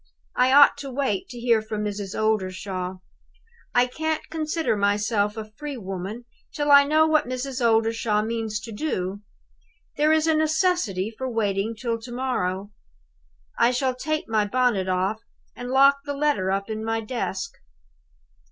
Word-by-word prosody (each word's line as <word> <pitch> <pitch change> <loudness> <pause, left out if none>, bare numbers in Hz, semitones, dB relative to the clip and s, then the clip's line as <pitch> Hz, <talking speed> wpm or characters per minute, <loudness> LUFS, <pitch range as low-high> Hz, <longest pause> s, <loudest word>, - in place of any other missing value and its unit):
I 255 +1 +3
ought 285 +1 +7
to 275 - -6
wait 260 -7 -2
to 245 - -8
hear 235 -2 +3
from 215 -1 -4
Mrs. 205 -2 -4
Oldershaw. 190 -3 -1 0.8
I 245 0 +5
can't 315 +5 -3
consider 315 -4 -1
myself 205 +1 +1
a 215 -1 -7
free 290 +4 -6
woman 195 +3 -6 0.3
till 290 -1 0
I 280 0 +8
know 310 +2 +4
what 310 -3 +2
Mrs. 255 0 -3
Oldershaw 225 -2 +2
means 220 -1 -2
to 230 - -8
do. 205 -6 -3 0.8
There 300 +1 +3
is 315 0 +3
a 320 - +3
necessity 310 - +1
for 260 +3 -4
waiting 215 -1 -1
till 230 0 -2
to 235 +2 -10
morrow. 205 -6 -2 0.9
I 235 - +5
shall 255 +1 0
take 310 +5 -3
my 220 -2 +2
bonnet 240 -5 +1
off, 190 +4 0 0.3
and 245 0 -6
lock 275 +2 +5
the 285 -1 -4
letter 280 -10 +1
up 195 +1 -1
in 220 -1 -4
my 225 0 -1
desk." 215 -4 -4
230 Hz, 155 wpm, -24 LUFS, 205-275 Hz, 0.9 s, I